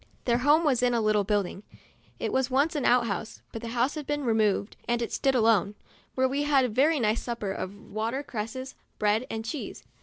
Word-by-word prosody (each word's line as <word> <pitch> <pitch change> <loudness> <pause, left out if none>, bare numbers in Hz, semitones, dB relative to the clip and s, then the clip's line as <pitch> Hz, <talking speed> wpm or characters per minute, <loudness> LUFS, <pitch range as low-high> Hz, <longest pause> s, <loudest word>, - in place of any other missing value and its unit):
Their 240 -1 +2
home 295 +5 +4
was 270 -6 +2
in 245 -1 +2
a - - +2
little 215 -2 +2
building, 200 -2 -1 0.6
(it - - -3
was 265 -1 +1
once 280 +5 +2
an 285 - -1
out 245 -1 +4
house, 215 +1 -5
but 225 - -6
the 235 - -6
house 245 +4 0
had 300 -3 -6
been 290 0 -1
re 235 -3 +2
moved 210 -1 +1
and 240 0 +1
it 235 - -3
stood 270 -1 +1
alone,) 220 -4 +3 0.4
where 260 0 +3
we 275 +2 -1
had 285 -3 +3
a - - -1
very 285 +7 +3
nice 220 -1 +1
supper 235 -5 -3
of 195 +1 -5
water 230 +6 -2
cresses, 260 +2 -5 0.2
bread 210 +4 +1
and 225 0 -4
cheese. 270 +6 -5
235 Hz, 220 wpm, -27 LUFS, 215-265 Hz, 0.6 s, home